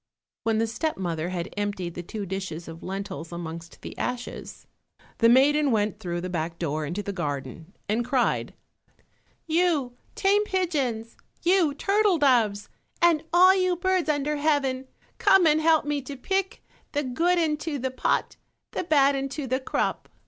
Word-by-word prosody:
When 225 -1 +1
the 225 - +2
step 270 +8 -2
mother 170 -3 -2
had 180 0 -4
emptied 200 -4 -3
the 175 - -5
two 205 +4 -6
dishes 185 -3 -5
of 165 0 -9
lentils 190 -3 -6
amongst 165 -1 -7
the - - -7
ashes, 250 0 -5 0.5
the 230 - +6
maiden 285 +4 +5
went 210 -4 0
through 175 -1 -3
the 180 - -4
back 165 -1 -3
door 155 -2 -2
into 185 +7 -3
the 200 - -4
garden 150 - -5
and 220 +3 +1
cried, 250 0 0 0.9
You 315 -7 +1 0.2
tame 405 +1 +3
pigeons, 280 - -1 0.3
you 345 -5 +3
turtle 400 +2 +2
doves, 235 -8 +2 0.3
and 340 -4 +4
all 365 +2 +7
you 370 -1 +2
birds 370 -1 0
under 295 0 0
heaven, 275 -3 0 0.3
come 385 -2 +5
and 310 0 +4
help 320 -1 +4
me 295 -1 -1
to 275 +1 -8
pick 385 +7 -2 0.3
"The 290 0 0
good 330 +8 +1
into 305 -2 0
the 260 0 -2
pot, 260 - -1 0.3
The - - -2
bad 285 -5 +4
into 275 +1 -3
the 260 +1 0
crop." 260 - -2
260 Hz, 160 wpm, -26 LUFS, 195-315 Hz, 0.9 s, all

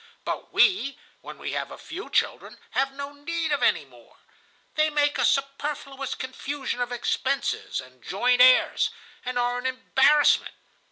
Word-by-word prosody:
But - - -4
we, 370 -9 +3 0.2
when - - -10
we - - -5
have - - -3
a - - -10
few 365 +7 -8
children, - - -1
have 270 +1 +1
no 280 +1 -7
need 320 +2 -3
of 285 -3 +1
any 160 -10 +2
more. 120 -3 -20 0.6
They 310 0 +2
make 290 -1 +1
a - - +3
superfluous 275 -1 -1
confusion 265 0 -4
of 245 0 -2
expenses 260 +3 -1
and 130 -1 -12
joint 245 +6 +2
heirs, 255 0 +5 0.3
and 250 0 -3
are 245 0 0
an 255 - -2
embarrassment. 265 +3 +3
270 Hz, 155 wpm, -25 LUFS, 245-290 Hz, 0.6 s, heirs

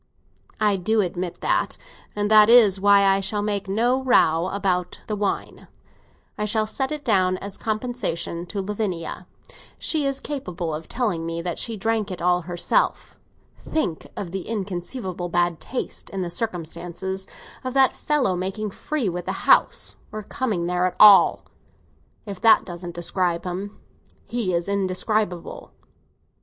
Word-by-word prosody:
"I 210 -2 +2
do 215 +4 +1
admit 180 -1 -4
that, - - 0 0.4
and 205 0 -1
that 215 0 +8
is 215 -5 +7
why 200 0 +6
I 195 0 +4
shall 205 +1 -1
make 205 -1 -1
no 240 +6 +2
row 175 -9 +3
about 185 -3 -1
the 215 - -3
wine; 205 -1 -3 0.7
I 210 - 0
shall 215 +1 +1
set 265 +5 -3
it 300 -1 -5
down 185 -5 +3
as 200 +1 -7
compensation 215 -7 -3
to 200 +2 -3
Lavinia. 200 -4 -4 0.5
She 300 -3 0
is 275 0 -2
capable 180 - -4
of 155 +1 -6
telling 210 -10 -1
me 165 0 -3
that 175 -1 -3
she 230 -2 -3
drank 220 0 -1
it 185 - -6
all 180 0 +2
herself. 175 - 0 0.4
Think 240 - -2
of 180 -4 -5
the 190 -1 -5
inconceivable 185 -2 -4
bad 175 -1 +1
taste, 255 - -4
in 195 -1 -3
the 175 - -5
circumstances, 190 -1 -4 0.4
of 255 0 -4
that 270 -1 +4
fellow 275 -11 0
making 195 +4 -3
free 295 +2 -3
with 175 -1 -3
the - - -4
house—or 215 -1 +2
coming 215 -8 -2
there 180 +1 +1
at 185 - -5
all! 210 -2 +7 0.8
If 200 -3 -7
that 225 - +6
doesn't 175 -1 -7
describe 175 0 0
him, 190 +3 -5 0.5
he 235 -6 -2
is 170 +1 -1
indescribable." 195 -1 -1
195 Hz, 150 wpm, -23 LUFS, 180-220 Hz, 0.8 s, that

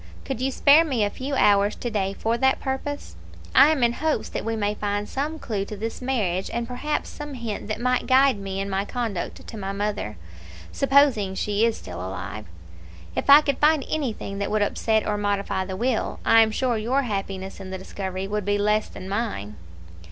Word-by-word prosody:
Could 265 -3 -4
you 265 - +1
spare 285 +4 +6
me 260 -9 0
a 205 - 0
few 275 +2 -4
hours 205 -3 +4
to 240 - -4
day 195 -2 -1
for 225 +1 0
that 265 +2 +2
purpose? 280 +2 -4 0.4
I 270 +2 +8
am 305 -5 +1
in 235 0 +3
hopes 315 +4 -1
that - - -4
we 225 0 -1
may 205 -1 0
find 205 0 -2
some 300 +4 -3
clue 210 -9 -3
to 210 - -7
this 225 +4 -5
marriage, 205 -8 -1
and 235 0 -2
perhaps 290 +5 -2
some 295 -2 -7
hint 230 -5 -5
that 215 0 -3
might 250 +1 0
guide 265 -3 +5
me 195 -1 -4
in 195 - -2
my 195 0 -1
conduct 220 -5 -4
to 225 - -8
my 195 -1 -4
mother, 205 - -3 0.5
supposing 270 -8 +3
she 210 +3 +1
is 230 - -1
still 90 -1 -8
alive. 95 +3 -6 0.7
If - - -2
I 285 +2 +10
could 280 -3 -1
find 300 -2 +4
anything 225 -9 -3
that 200 - -1
would 215 -1 +2
upset 220 +1 +1
or 210 - 0
modify 200 -2 -1
the 190 0 -5
will, 240 0 -1
I 225 - +7
am 220 - +4
sure 240 +1 0
your 255 +6 +1
happiness 195 -4 -4
in 190 -1 -8
the 190 - -4
discovery 190 0 -5
would 210 +1 -2
be 205 +1 +1
less 210 +1 +1
than 185 - -9
mine." 195 - -3
215 Hz, 205 wpm, -24 LUFS, 200-260 Hz, 0.7 s, I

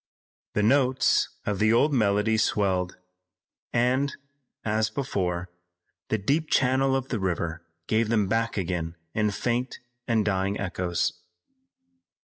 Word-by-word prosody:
The 105 - +2
notes 130 +2 +3 0.2
of 100 -2 -1
the 110 +1 +4
old 145 +6 +4
melody 105 -2 +2
swelled, 95 -5 +1 0.7
and, 130 +4 +2 0.5
as 110 0 +1
before, 95 -8 -2 0.6
the 110 - +1
deep 145 +10 0
channel 135 +1 +3
of 135 0 -2
the 115 - -1
river 85 -3 -2 0.2
gave 110 +2 +1
them 110 -3 +2
back 115 +2 0
again 85 -3 -2 0.2
in 105 -1 +1
faint 120 +5 -2 0.3
and 110 -3 +2
dying 100 0 0
echoes. 90 -2 -1
110 Hz, 125 wpm, -26 LUFS, 95-125 Hz, 0.7 s, the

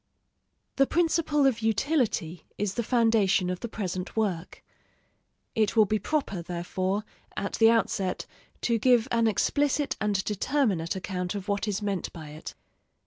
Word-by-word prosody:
The 275 0 +4
principle 320 -3 +2
of 255 -4 +3
utility 220 - 0
is 205 -1 -1
the 235 - -1
foundation 220 -6 +2
of 180 - -4
the - - -4
present 185 -3 -5
work; 185 -6 -2 0.9
it 215 0 +1
will 220 -2 +6
be 215 +2 0
proper, 270 - -1
therefore, 185 +4 -2 0.3
at 200 - -3
the 225 0 +7
outset 200 -5 0 0.4
to 230 -1 +1
give 245 0 +4
an 230 -1 +3
explicit 285 +6 +1
and 200 -2 +1
determinate 210 - 0
account 185 0 -3
of 200 0 -5
what 200 +1 -1
is 210 0 -2
meant 200 -3 -2
by 155 -3 -9
it. 155 +1 -9
210 Hz, 145 wpm, -27 LUFS, 185-235 Hz, 0.9 s, the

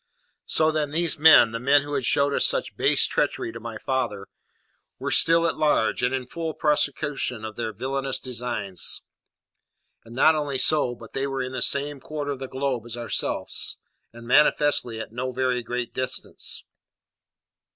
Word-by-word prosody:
So, 155 0 +3
then, 155 -2 -1
these 165 0 0
men, 155 -7 +8
the 115 - -4
men 140 +3 +4
who 145 0 -7
had 135 -3 -1
showed 140 +2 +2
such - - +1
base - - +3
treachery - - -1
to 115 - -9
my 115 -1 -7
father, 105 -6 -2 0.7
were - - -4
still 165 +1 +4
at 165 - 0
large, 150 -8 +1
and 125 +1 +1
in 130 -1 -2
full 160 +4 -5
prosecution 145 -5 0
of 110 -1 -7
their 115 -2 -3
villainous 135 +5 -2
designs. 115 -7 -2 1.0
And 115 +1 -13
not 155 +5 +5
only 145 -3 -2
so, 135 -3 +3
but 115 -2 -13
they 135 +1 -1
were 135 -1 -2
in 130 - -5
the 130 - -4
same 145 0 0
quarter 145 +1 -5
of 140 - -5
the 135 - -5
globe 130 -3 -3
as 120 0 -5
ourselves, 120 -1 -2 0.3
and 115 0 -12
manifestly 145 -3 +3
at 110 - -7
no 125 +2 -3
very 125 -1 0
great 120 0 -4
distance. 130 0 -4
130 Hz, 170 wpm, -24 LUFS, 120-145 Hz, 1.0 s, men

